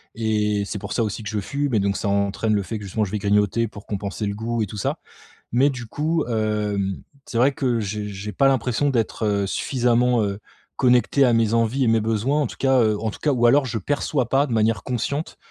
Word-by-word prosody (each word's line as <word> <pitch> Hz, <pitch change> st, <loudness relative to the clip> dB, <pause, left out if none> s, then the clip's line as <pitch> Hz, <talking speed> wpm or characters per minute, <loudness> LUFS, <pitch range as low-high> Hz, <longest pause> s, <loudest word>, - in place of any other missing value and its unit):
Et 105 Hz, -2 st, 0 dB
c'est 105 Hz, -, -4 dB
pour 100 Hz, +1 st, -5 dB
ça -, -, 0 dB
aussi 110 Hz, +1 st, -4 dB
que 105 Hz, -, -5 dB
je 105 Hz, -, -2 dB
fume 140 Hz, +6 st, -2 dB
et 110 Hz, -, +3 dB
donc 100 Hz, 0 st, 0 dB
ça -, -, -3 dB
entraîne 100 Hz, +2 st, 0 dB
le 105 Hz, -, +2 dB
fait 100 Hz, +5 st, -5 dB
que -, -, -9 dB
justement 105 Hz, +3 st, -1 dB
je -, -, -7 dB
vais 105 Hz, -, -1 dB
grignoter 105 Hz, +3 st, +2 dB
pour 105 Hz, -1 st, -12 dB
compenser 100 Hz, +1 st, -3 dB
le 100 Hz, -, -3 dB
goût 115 Hz, +2 st, -2 dB
et 105 Hz, -, 0 dB
tout 105 Hz, -, -8 dB
ça 100 Hz, -, -2 dB, 0.5 s
mais 130 Hz, +5 st, +4 dB
du 130 Hz, -3 st, -7 dB
coup, 155 Hz, +6 st, -1 dB
hem, 105 Hz, -4 st, -1 dB, 0.3 s
c'est 115 Hz, -, -3 dB
vrai 130 Hz, +4 st, +4 dB
que 130 Hz, -5 st, 0 dB
j'ai 105 Hz, 0 st, -3 dB
j'ai 100 Hz, +1 st, -6 dB
pas 135 Hz, +4 st, +3 dB
l'impression 130 Hz, +1 st, +1 dB
d'être, 115 Hz, -3 st, -1 dB
heu, 100 Hz, -1 st, +1 dB
suffisamment, 125 Hz, +2 st, +1 dB
heu, 100 Hz, 0 st, -3 dB, 0.4 s
connecté 125 Hz, +2 st, +3 dB
à 125 Hz, -, +4 dB
mes 115 Hz, -1 st, +2 dB
envies 115 Hz, +4 st, +2 dB
et -, -, +2 dB
mes 115 Hz, 0 st, +3 dB
besoins 115 Hz, +7 st, 0 dB
en -, -, -1 dB
tout -, -, -10 dB
cas, 135 Hz, -1 st, +3 dB
heu, 110 Hz, -2 st, +2 dB
en 110 Hz, -, -1 dB
tout -, -, -11 dB
cas 150 Hz, -, +1 dB
ou 120 Hz, -2 st, +3 dB
alors 140 Hz, +4 st, +5 dB
je 115 Hz, -2 st, -2 dB
perçois 135 Hz, +2 st, -1 dB
pas 135 Hz, +3 st, +3 dB
de -, -, -4 dB
manière 110 Hz, -1 st, +1 dB
consciente, 140 Hz, +5 st, -3 dB
115 Hz, 245 wpm, -23 LUFS, 105-125 Hz, 0.5 s, alors